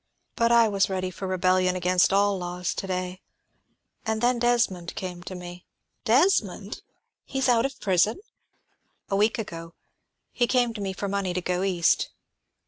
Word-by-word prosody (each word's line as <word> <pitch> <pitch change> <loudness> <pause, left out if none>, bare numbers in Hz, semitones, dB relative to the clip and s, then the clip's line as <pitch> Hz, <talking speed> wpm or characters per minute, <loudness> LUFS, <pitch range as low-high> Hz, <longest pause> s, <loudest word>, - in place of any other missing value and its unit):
But 230 0 +2
I 235 -1 +6
was 200 -2 +1
ready 185 -1 -2
for 190 +2 -6
rebellion 185 0 +2
against 180 +1 +3
all 200 +1 +3
laws 180 0 -3
to 195 - -5
day; 185 0 -3 0.8
and 220 -1 -1
then 240 +1 +2
Desmond 235 -8 +1
came 180 -2 -5
to 185 +1 -8
me 175 0 -9 0.2
" - - -51
"Desmond! 360 +9 +1 0.4
He 270 - -6
is 265 - +1
out 240 +1 +3
of 275 - -14
prison?" 195 - +2 0.9
"A - - +2
week 215 +5 +2
ago. 165 -6 -7 0.6
He 240 - +1
came 245 -2 +2
to 215 - -6
me 195 -1 -2
for 200 +2 -4
money 195 -2 -2
to 180 - -1
go 180 +1 -1
East. 180 -3 +2
190 Hz, 170 wpm, -26 LUFS, 180-230 Hz, 0.9 s, I